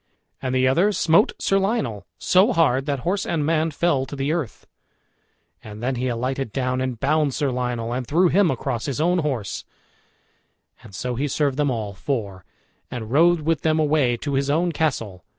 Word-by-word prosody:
And 130 0 -2
the 130 0 +3
other 175 +11 +3
smote 190 0 +3
Sir 195 - +1
Lionel 135 - -2
so 190 +7 +3
hard 140 - +2
that 140 -3 -1
horse 190 +6 -1
and 155 -3 -1
man 160 +1 +1
fell 145 -4 0
to 145 - -7
the 140 +2 -1
earth; 155 -11 -4 1.0
and 105 +1 -9
then 130 +2 0
he 125 +1 -2
alighted 130 +1 -2
down 130 0 -1
and 130 -3 -3
bound 150 0 +1
Sir 145 -3 0
Lionel, 125 -2 -2
and 125 -1 -3
threw 175 +5 +3
him 195 0 +3
across 125 -3 -2
his 140 -1 -3
own 175 +3 +2
horse; 130 - -3 1.2
and 95 - -13
so 125 +5 -3
he 135 +5 -1
served 140 -1 0
them 145 -1 +1
all 110 -5 -3
four, 100 -4 -4 0.5
and 115 -3 -6
rode 170 +4 +4
with 160 +1 0
them 155 0 +2
away 150 -6 +2
to 140 +4 -4
his 135 +1 0
own 170 +4 +1
castle. 115 - -2
135 Hz, 185 wpm, -23 LUFS, 125-160 Hz, 1.2 s, rode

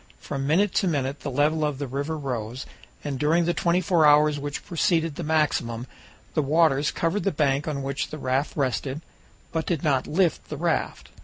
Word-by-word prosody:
From 135 0 -4
minute 185 +6 +3
to 190 - +2
minute 140 -3 -1
the 145 - -5
level 150 +4 +1
of 150 -2 -1
the 140 - -3
river 140 +4 -3
rose, 125 -3 -4 0.4
and 140 -3 -3
during 165 +4 +3
the 175 - +1
twenty 170 +1 +1
four 170 -2 +2
hours 150 0 +5
which 145 0 -5
preceded 165 -2 +1
the 160 - -6
maximum 140 -7 0 0.5
the 155 - +2
waters 150 -1 +3
covered 170 +5 -1
the 195 - +1
bank 145 -1 +1
on 140 -3 -2
which 140 +1 -2
the 155 - -6
raft 135 +2 -1
rested, 135 +2 -1 0.5
but 160 -1 -2
did 165 -5 -1
not 140 -4 +1
lift 170 -1 +1
the 150 - -5
raft. 170 +2 -1
150 Hz, 190 wpm, -25 LUFS, 140-165 Hz, 0.5 s, hours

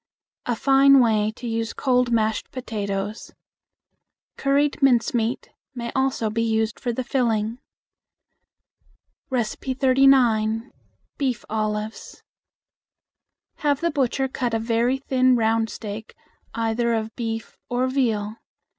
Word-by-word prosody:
Fine 275 +2 +5
way 215 -3 +3
to 245 - -7
use 225 0 -2
cold 250 -2 +1
mashed 220 -1 0
potatoes. 205 -4 -4 1.0
Curried 280 +2 +1
mincemeat 240 -2 +1 0.2
may 235 -1 -4
also 265 -5 0
be 230 +1 -1
used 220 -1 0
for 245 - -2
the 255 +2 -3
filling. 230 -2 0 1.7
39. 255 -2 +2 0.5
Beef 260 -5 -1
Olives. 215 0 -3 1.3
Have 290 -2 0
the 340 0 +1
butcher 270 -2 0
cut 245 -3 -2
a - - +1
very 235 +3 +1
thin 255 -1 +2
round 225 -1 +1
steak 215 0 -7 0.4
either 230 +1 0
of 220 0 -4
beef 225 -2 -4
or 245 +1 0
veal. 225 -5 -1
235 Hz, 105 wpm, -23 LUFS, 220-260 Hz, 1.7 s, Fine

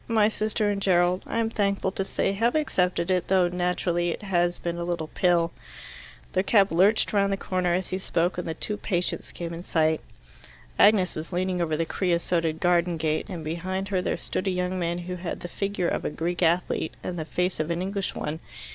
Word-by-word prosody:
My 220 -2 +4
sister 215 -1 0
and 200 -1 -2
Gerald, 180 -1 +3
I - - -2
am 225 -1 +1
thankful 200 -3 0
to 195 - -2
say, 195 - 0
have 230 +6 +1
accepted 180 - +1
it, 180 -1 +1
though 185 -2 +4
naturally 175 -1 0
it 170 - -4
has 175 -3 +1
been 170 0 -3
a - - -2
little 170 -3 -2
pill." 170 -2 +3 0.8
Their 185 - +3
cab 200 0 +4
lurched 195 +8 +3
round 200 -1 +3
the 195 - 0
corner 180 -2 0
as 185 0 -2
he 185 - -2
spoke, 175 -1 0
and 180 - -4
the 160 - -3
two 210 +5 -3
patients 180 -4 -2
came 170 -1 -5
in 165 - -6
sight. 160 -3 +1 0.8
Agnes 200 -3 +5
was 155 +3 -5
leaning 180 0 0
over 155 -2 0
the 165 - 0
creosoted 170 -3 0
garden 175 -1 +2
gate, 155 -1 -1
and 175 -4 -5
behind 185 +4 -3
her 190 -2 +1
there - - -1
stood 190 - -3
a - - +4
young 180 0 -1
man 170 0 -1
who 180 +1 -5
had 175 -1 -5
the - - -5
figure 195 0 -2
of - - -1
a - - -1
Greek 170 +4 -3
athlete 170 -1 +1
and 175 -2 -4
the - - -1
face 180 +3 -1
of 155 +1 -1
an 170 +1 -1
English 195 0 -2
one. 150 +2 -3
180 Hz, 215 wpm, -26 LUFS, 170-195 Hz, 0.8 s, Agnes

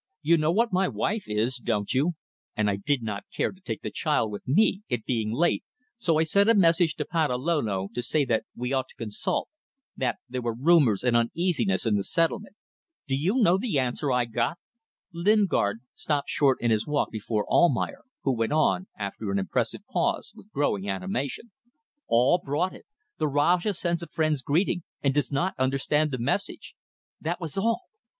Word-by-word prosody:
You 165 +3 +5
know 155 +1 +2
what 225 +3 +1
my 185 +1 +3
wife 215 +2 -2
is, 110 +5 0
don't 110 -4 -1
you? 145 +7 +2 0.4
And 105 -1 +2
I - - 0
did 125 +6 -1
not 105 -2 -4
care - - -1
to 190 - -18
take 110 - -5
the - - -4
child 110 - 0
with 105 - -8
me 195 +7 +3
it 120 -3 -2
being 110 -4 -1
late 170 +9 +1 0.4
so 170 -9 +2
I 160 - +4
sent 200 +7 +3
a 230 - +6
message 170 -3 +4
to - - -3
Patalolo 130 - 0
to 120 - -2
say 145 +3 +1
that 115 -3 +1
we 125 +2 -3
ought 130 -1 0
to - - -17
consult; 105 -3 -2 0.5
that 130 - -1
there 125 0 -4
were 120 -1 -2
rumours 135 - +4
and 125 -2 +2
uneasiness 170 - +1
in 105 -2 +2
the 100 - -1
settlement. 165 - 0 0.5
Do 135 - 0
you 190 - +1
know 180 -1 +5
what 215 -1 -2
answer 130 +2 -1
I 125 -1 +2
got?" 120 +7 -1 0.6
Lingard 170 - +2
stopped 150 -4 -2
short 135 -3 +3
in 120 - +2
his 110 -1 +1
walk 150 -1 0
before 105 -1 -2
Almayer, 275 - +2 0.2
who 135 -2 +1
went 115 +4 0
on, 155 +4 +2
after 100 +1 -4
an 100 - 0
impressive 95 -2 -1
pause, - - -1
with 205 - -16
growing 105 -9 0
animation. 110 - -3 0.6
"All 125 +9 +4
brought 165 +4 -1
it: - - -14 0.3
'The 155 - +2
Rajah 170 +8 +2
sends 170 -1 -1
a 170 - -6
friend's 155 -2 0
greeting, 175 +6 +1 0.2
and 140 -1 +2
does 145 -2 0
not 175 +7 0
understand 135 +3 +1
the 130 - -3
message.' 120 - -2 0.5
That 170 +3 -2
was 165 -5 -5
all. 225 - +1
145 Hz, 185 wpm, -26 LUFS, 115-170 Hz, 0.6 s, a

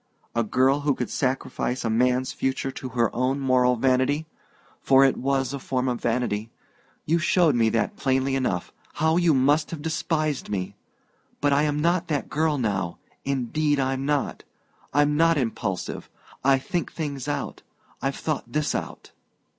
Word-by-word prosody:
A 115 - +1
girl 130 +5 +2
who 145 -1 +1
could 125 - -4
sacrifice 130 -1 -1
a - - +1
man's 125 +3 +2
future 135 0 -1
to 130 - -7
her 120 -3 0
own 130 +3 +1
moral 125 -2 +3
vanity 130 +5 +1 0.6
for 135 0 +6
it 135 - +3
was 135 0 0
a 140 - -3
form 130 0 -1
of 125 -1 -2
vanity; 115 -2 -1 0.6
you 165 +3 +2
showed 170 -3 +3
me 115 -2 +3
that 110 -2 -1
plainly 135 0 +1
enough 110 -10 -1 0.2
how 160 +2 +2
you 170 -4 +4
must 145 +4 +3
have 165 - -5
despised 155 -2 -1
me! 95 -3 -3 0.6
But 145 0 +2
I 140 - +4
am 145 0 -1
not 175 +2 +1
that 145 -3 -2
girl 155 -1 +1
now 95 -8 -1 0.3
indeed 140 +3 0
I'm 135 0 0
not. 145 0 -1 0.5
I'm 145 +1 +3
not 165 0 +4
impulsive 110 -7 -3 0.3
I 135 0 +5
think 170 +6 -3
things 145 -4 -4
out. 145 - -3 0.4
I've 135 +1 -1
thought 155 -3 -3
this 150 0 0
out. - - -5
135 Hz, 160 wpm, -25 LUFS, 125-150 Hz, 0.6 s, for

